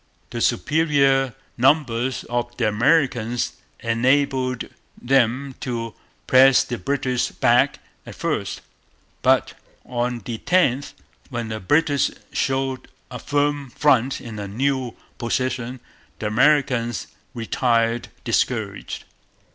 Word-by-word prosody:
The - - -4
superior 135 - +2 0.2
numbers 130 -2 +2
of 120 0 -3
the 120 - +1
Americans 120 0 +1 0.3
enabled 130 +2 +1 0.3
them 130 +1 +1
to 115 -3 -4 0.3
press 130 0 +6
the 120 - -5
British 130 +3 -1
back - - +3 0.3
at - - -10
first. - - -2 0.6
But, - - +3 0.3
on 120 -2 -2
the 115 -2 -4
10th, 145 -7 +1 0.4
when 120 -3 -4
the 110 0 -4
British 145 - +2 0.2
showed 135 -1 -1 0.2
a 125 - -6
firm 145 -1 0
front 135 -1 +2
in 115 -5 -8
a 100 - -4
new 130 +3 -1 0.2
position, 125 +1 -2 0.4
the - - -6
Americans 120 - +2 0.3
retired 115 0 +1 0.2
discouraged. - - -1
125 Hz, 105 wpm, -22 LUFS, 115-135 Hz, 0.6 s, press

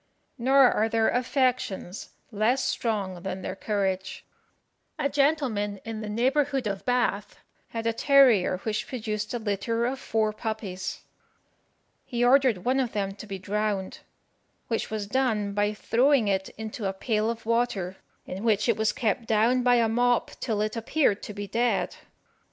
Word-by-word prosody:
Nor 265 +1 +5
are 220 +1 +1
their 225 0 +2
affections 250 -7 -1 0.2
less 235 +5 +1
strong 195 -6 -2
than 190 0 -5
their - - -4
courage. 190 -2 -2 0.7
A - - +1
gentleman 275 -9 +1
in 225 -1 -5
the 215 - -5
neighbourhood 265 +4 +1
of 200 -2 -3
Bath 240 -5 0 0.3
had 230 0 -5
a 230 - +1
terrier 245 -8 +5
which 215 -1 -2
produced 215 -4 -4
a 245 - -1
litter 230 +2 -1
of 260 +2 -2
four 220 -4 0
puppies. 215 -4 -5 1.0
He 240 0 -1
ordered 250 -7 +4
one 260 +2 +2
of 250 -3 -1
them 195 -2 -2
to 210 +2 -11
be 195 -1 -5
drowned, 200 0 -2 0.7
which 225 - -1
was 215 -2 -3
done 210 -3 0
by 205 +1 +1
throwing 245 +2 +3
it 190 -1 0
into 220 -1 -4
a 190 - -2
pail 215 +2 0
of 230 -1 -5
water, 220 -6 0 0.3
in 190 +3 -6
which 215 -1 +2
it 230 - +2
was 220 0 +2
kept 230 -3 -1
down 230 +4 +3
by 245 0 +4
a 230 -1 +3
mop 245 +1 +1
till 220 -4 -1
it 215 +1 -1
appeared 230 -1 +1
to - - -7
be 205 0 -4
dead. 240 +4 0
220 Hz, 160 wpm, -26 LUFS, 205-245 Hz, 1.0 s, Nor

